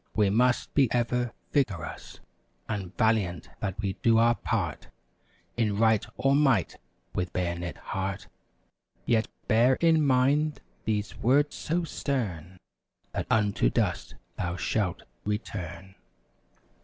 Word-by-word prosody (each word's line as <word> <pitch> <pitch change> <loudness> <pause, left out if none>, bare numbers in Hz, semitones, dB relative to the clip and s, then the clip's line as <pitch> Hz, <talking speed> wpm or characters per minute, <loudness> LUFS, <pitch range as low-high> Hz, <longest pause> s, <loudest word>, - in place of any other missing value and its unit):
We 105 -3 +3
must 125 +3 +2
be 135 -5 +3
ever 120 0 0 0.2
vigorous 100 - -2 0.5
And 100 -4 -4
valiant 95 -9 +1
that 95 -1 -3
we 100 -2 -2
do 115 -1 +4
our 115 +1 +5
part 95 - -2 0.7
In 105 -4 +1
right 110 -1 +4
or 135 0 +3
might 135 - +2 0.3
with 90 0 -2
buoyant 85 -1 -2
heart; 95 0 -4 0.8
Yet, 115 -2 +2 0.2
bear 120 +4 +5
in 160 0 +3
mind 140 +3 +2 0.3
these 105 -1 -1
words, 145 +5 +3
so 170 +3 -1
stern— 95 - -3 0.5
"That - - -3
unto 105 - +2
dust - - -1 0.2
thou 85 -1 -1
shalt 95 0 -1 0.2
return! 100 -2 -4
110 Hz, 120 wpm, -28 LUFS, 95-125 Hz, 0.8 s, our